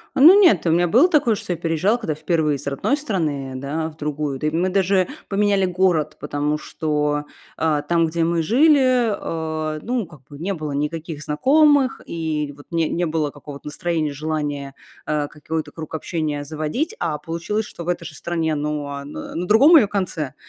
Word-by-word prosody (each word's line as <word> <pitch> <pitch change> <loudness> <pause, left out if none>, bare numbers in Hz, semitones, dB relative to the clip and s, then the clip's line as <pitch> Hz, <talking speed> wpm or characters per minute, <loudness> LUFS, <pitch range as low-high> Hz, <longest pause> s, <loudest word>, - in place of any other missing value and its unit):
Ну 345 +9 +8
нет, 350 - +5
у - - +3
меня 175 +2 +3
было 250 - +5
такое, 270 -9 +3
что 205 -3 -4
я 175 - -1
переезжала, 170 +7 +1
когда 215 -10 -3
впервые 155 -1 0
из - - -11
родной 140 - 0
страны, 155 - -2
да, 150 +4 -3
в 155 - -18
другую. 150 -2 -3
Да 150 - -2
и - - 0
мы 170 +4 0
даже 190 -1 +2 0.2
поменяли 200 -1 +2
город, 175 -4 +1
потому 150 +1 -1
что, 150 -1 -1 0.3
а, 155 -2 +1
там, 165 +2 +2
где 165 +1 0
мы 170 0 +1
жили, 255 - +4 0.7
э, 155 - -7
ну, 240 -5 -2
как 155 -5 -16
бы 145 - -11
не 190 +5 -2
было 155 -3 -5
никаких 155 +1 -3
знакомых, 280 - +3
и 155 -3 -3
вот 145 - -15
не 165 -2 +1
не 175 0 -1
было 155 -2 -1
какого-то 145 0 -11
настроения, 155 -1 -2
желания, 145 -2 -3 0.3
э, 150 -1 -1
какой-то 155 0 -5
круг 160 -1 -8
общения 155 -3 -3
заводить, 155 - -3
а 160 -3 -2
получилось, 190 +6 -3
что 170 - -9
в - - -8
этой 175 -1 -1
же 155 - -8
стране, 165 -1 -2
ну, 150 0 -3
а 140 0 -5
н 145 +1 -10
на 175 +2 -5
другом 275 - +7
ее 245 -10 +6
конце 180 -8 -3
160 Hz, 190 wpm, -21 LUFS, 150-190 Hz, 0.7 s, Ну